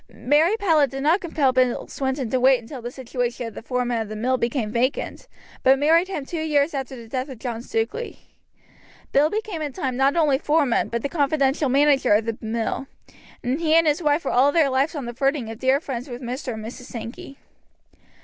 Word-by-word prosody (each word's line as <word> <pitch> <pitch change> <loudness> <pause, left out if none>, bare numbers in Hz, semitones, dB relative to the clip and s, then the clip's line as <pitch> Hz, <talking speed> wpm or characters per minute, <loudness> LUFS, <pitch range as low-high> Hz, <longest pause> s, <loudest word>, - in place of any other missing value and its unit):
Mary 295 - +2
Powlett 320 -9 +3
did 270 +1 -5
not 330 +6 +3
compel 295 -6 +1
Bill 255 -1 +1
Swinton 265 -1 -2
to 255 - +2
wait 260 0 +5
until 240 +3 -9
the 240 - -5
situation 245 -2 -4
of - - -9
foreman 245 -2 0
of 220 - -5
the 215 - -5
mill 250 +4 +1
became 235 -3 -1
vacant, 245 +4 -1 0.3
but 265 +1 +5
married 325 +5 +3
him 340 -8 -4
two 325 +2 -4
years 300 -1 +1
after 270 -1 -4
the 235 -2 -11
death 255 +4 -3
of 260 - -8
John 230 -1 -5
Stukeley. 235 - -3 0.9
Bill 290 +3 +4
became 420 -4 -3
in 295 -3 -3
time 260 -1 -2
not 270 +3 +2
only 300 -5 +3
foreman 295 -5 +1
but 235 -1 -3
the - - +1
confidential 285 -1 +1
manager 280 -3 +4
of 215 +1 +1
the 230 -1 -2
mill, 230 +4 -2 0.6
and 255 +4 -1
he 320 -1 +3
and 330 0 +5
his 300 +2 +2
wife 295 0 +1
were - - 0
all 270 +3 +4
their 300 -3 +3
lives 275 +5 +1
on 280 -4 -4
the 240 - -5
footing 270 -2 -1
of 225 - -9
dear 265 +1 +3
friends 265 -3 -6
with 245 -1 -6
Mr. 250 0 -4
and 220 0 -7
Mrs. 245 +2 -8
Sankey. 235 +4 -8
265 Hz, 210 wpm, -23 LUFS, 240-295 Hz, 0.9 s, wait